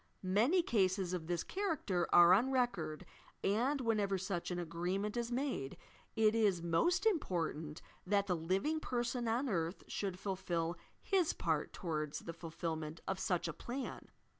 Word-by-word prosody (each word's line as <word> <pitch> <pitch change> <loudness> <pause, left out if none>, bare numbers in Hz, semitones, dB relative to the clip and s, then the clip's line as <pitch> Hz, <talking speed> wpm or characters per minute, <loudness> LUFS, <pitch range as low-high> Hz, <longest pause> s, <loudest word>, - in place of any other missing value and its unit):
Many 230 - +3
cases 190 - +1
of 165 -3 -3
this 175 -1 -1
character 300 - -1
are 175 +1 +8
on 230 +8 +4
record, 200 -13 0 0.4
and, 245 +8 +2
whenever 210 -5 +1
such 190 -2 -3
an 180 - -2
agreement 175 +5 -2
is 235 0 -2
made, 245 - -2 0.4
it 220 -1 +4
is 205 -6 +2
most 170 - +2
important 165 - -1 0.2
that 200 0 +3
the 185 -3 +1
living 190 - 0
person 240 -3 -1
on 240 +5 +1
earth 170 -5 -1
should 195 -3 -3
fulfil 175 -3 -2 0.2
his 375 -4 +2
part 160 -3 -1
towards 155 -4 -3
the 165 - -6
fulflbnent 160 -1 -5
of 190 -1 -1
such 180 -2 0
a 165 - -3
plan. 255 - -5
190 Hz, 150 wpm, -36 LUFS, 170-240 Hz, 0.4 s, are